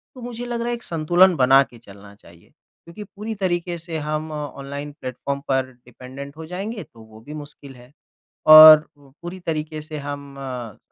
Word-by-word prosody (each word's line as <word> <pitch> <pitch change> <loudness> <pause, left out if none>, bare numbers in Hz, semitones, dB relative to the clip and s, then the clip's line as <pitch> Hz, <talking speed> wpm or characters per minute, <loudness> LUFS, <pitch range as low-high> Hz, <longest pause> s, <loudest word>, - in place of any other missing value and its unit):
तो 255 - -11
मुझे 240 0 -7
लग 240 -1 -4
रहा 235 - -3
है 240 - -1
एक 235 - -12
संतुलन 175 +3 +3
बना 135 0 +5
के 120 -2 -17
चलना 100 -2 -15
चाहिए। 85 -4 -20 0.3
क्योंकि 170 +5 -10
पूरी 210 +2 -7
तरीके 175 -2 -2
से 165 -1 -6
हम 155 +1 -4
ऑनलाइन 145 -1 -7
प्लेटफ़ॉर्म 130 +2 -4
पर 135 -1 +1
डिपेंडेंट 130 +3 -12
हो 160 - -8
जाएँगे 195 +6 -6
तो 115 - -19
वो 110 0 -16
भी 145 +7 -11
मुश्किल 145 -2 -11
है 125 +1 -17 0.6
और 155 0 +10
पूरी 165 +6 -11
तरीके 155 -2 -4
से 155 0 -8
हम 140 -1 -7
अ, 125 -5 -7
150 Hz, 180 wpm, -22 LUFS, 135-175 Hz, 0.6 s, और